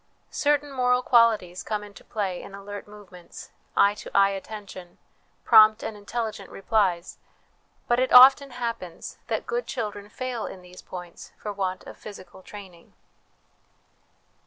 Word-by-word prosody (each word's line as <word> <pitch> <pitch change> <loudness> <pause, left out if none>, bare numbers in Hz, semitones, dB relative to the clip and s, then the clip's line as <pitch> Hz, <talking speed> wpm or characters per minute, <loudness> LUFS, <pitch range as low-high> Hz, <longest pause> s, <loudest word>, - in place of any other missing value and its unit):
Certain 290 -1 +1
moral 250 -1 +1
qualities 220 -7 +3
come 210 -1 -3
into 205 -1 -13
play 195 -4 -3
in 195 - -10
alert 200 +1 -9
movements, 195 -4 -13 0.3
eye 200 0 +5
to 210 - -10
eye 200 0 +5
attention, 195 -3 -9 0.5
prompt 215 -2 +6
and 220 - -5
intelligent 210 -1 -5
replies; 195 -4 -1 0.7
but 240 0 +2
it 255 - +1
often 265 +2 +8
happens 230 -8 -6
that - - -2
good 480 +1 -3
children 205 -4 -5
fail 250 0 -4
in 185 - -10
these 180 0 -13
points 180 -2 -10
for 210 - -6
want 185 -2 -3
of - - -11
physical 195 -2 -11
training. 185 -4 -13
205 Hz, 135 wpm, -25 LUFS, 190-235 Hz, 0.7 s, often